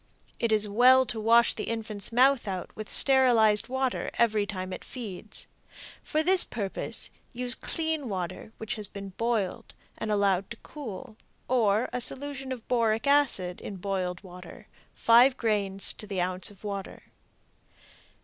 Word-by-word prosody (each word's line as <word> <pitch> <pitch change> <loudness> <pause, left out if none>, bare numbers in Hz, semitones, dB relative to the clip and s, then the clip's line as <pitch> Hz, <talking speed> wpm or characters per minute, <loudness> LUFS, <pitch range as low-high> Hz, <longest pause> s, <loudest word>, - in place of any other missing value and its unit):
It 235 - 0
is 215 -1 +2
well 255 +5 +5
to 230 - -4
wash 230 +2 +4
the - - -5
infant's 220 -3 -3
mouth 255 0 +4
out 185 -2 -5
with 215 -1 -7
sterilized 240 -6 +5
water 260 0 -1
every 215 -3 +2
time 185 -2 -5
it - - -7
feeds. 215 -4 -7 0.6
For 310 +1 0
this 370 +2 +5
purpose 200 -4 -3 0.2
use 245 0 0
clean 315 -2 -3
water 185 +1 -5
which 220 - -4
has 210 -2 -6
been 200 0 -8
boiled 220 -1 -2 0.2
and 215 - -3
allowed 200 -2 +1
to 235 - -8
cool, 225 -6 -8 0.3
or 225 -2 +2
a 250 - -1
solution 270 +1 -2
of 245 -3 -6
boric 225 -2 +1
acid 270 -11 +2
in 200 - -7
boiled 185 -1 -3
water 180 +4 -12 0.3
5 245 +3 +5
grains 200 -4 -1
to 210 - -6
the 195 -2 -3
ounce 180 0 -1
of 205 -1 -18
water. 200 -2 -6
220 Hz, 150 wpm, -28 LUFS, 195-250 Hz, 0.6 s, well